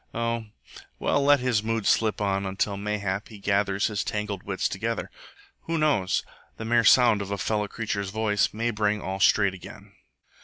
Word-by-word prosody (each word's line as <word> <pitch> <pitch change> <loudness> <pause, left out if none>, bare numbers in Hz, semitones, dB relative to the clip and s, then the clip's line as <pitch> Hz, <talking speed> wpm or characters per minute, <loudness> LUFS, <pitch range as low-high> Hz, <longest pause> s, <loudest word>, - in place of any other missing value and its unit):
Oh, 115 -1 -1 0.5
well, 145 - +1
let 145 -1 +5
his 125 -4 +1
moods 115 -1 -2
slip 110 -1 +2
on, 100 -1 0
until, 100 +1 -1
mayhap, 100 -1 -3
he 110 - -12
gathers 100 0 0
his 105 -3 -1
tangled 105 -2 -3
wits 95 -1 -2
together. 110 +3 -3 0.5
Who 165 0 -1
knows? 140 -12 +1 0.3
the 110 - -6
mere 120 +1 +3
sound 115 -3 +5
of 100 - -5
a 100 - -2
fellow 105 0 -1
creature's 100 -2 -3
voice 105 0 +1
may 115 +2 -1
bring 105 -1 0
all 95 -1 -4
straight 100 0 +4
again. 95 - -12
105 Hz, 175 wpm, -26 LUFS, 100-115 Hz, 0.5 s, let